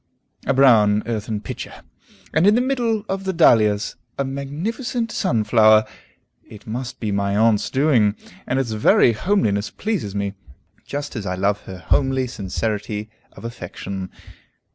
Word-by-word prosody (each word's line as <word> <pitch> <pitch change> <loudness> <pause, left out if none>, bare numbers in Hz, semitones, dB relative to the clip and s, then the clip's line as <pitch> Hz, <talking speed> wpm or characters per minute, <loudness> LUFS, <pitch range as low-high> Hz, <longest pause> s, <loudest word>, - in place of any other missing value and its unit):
A - - +3
brown 110 -6 +5
earthen 110 -2 -3
pitcher! 100 - -8 0.5
And 160 +5 +4
in 210 - +6
the - - +3
middle 240 -5 0
of 195 0 -3
the 190 - -1
dahlias, 110 - +3 0.2
a 140 - 0
magnificent 205 - -3
sunflower! 110 - +4 0.6
It 105 -1 -14
must 120 +3 -5
be 110 -3 -2
my 100 0 0
aunt's 110 -1 +3
doing, 130 -7 +3 0.3
and 130 - 0
its 130 -4 -1
very 110 +2 +4
homeliness 110 - 0
pleases 190 - -3
me, 100 -1 -2 0.5
just 145 0 -5
as 105 -4 -4
I 90 - -1
love 100 +2 0
her 95 - -8
homely 130 - +1
sincerity 105 -1 -4 0.2
of - - -11
affection. 95 -4 -6
115 Hz, 140 wpm, -21 LUFS, 105-145 Hz, 0.6 s, in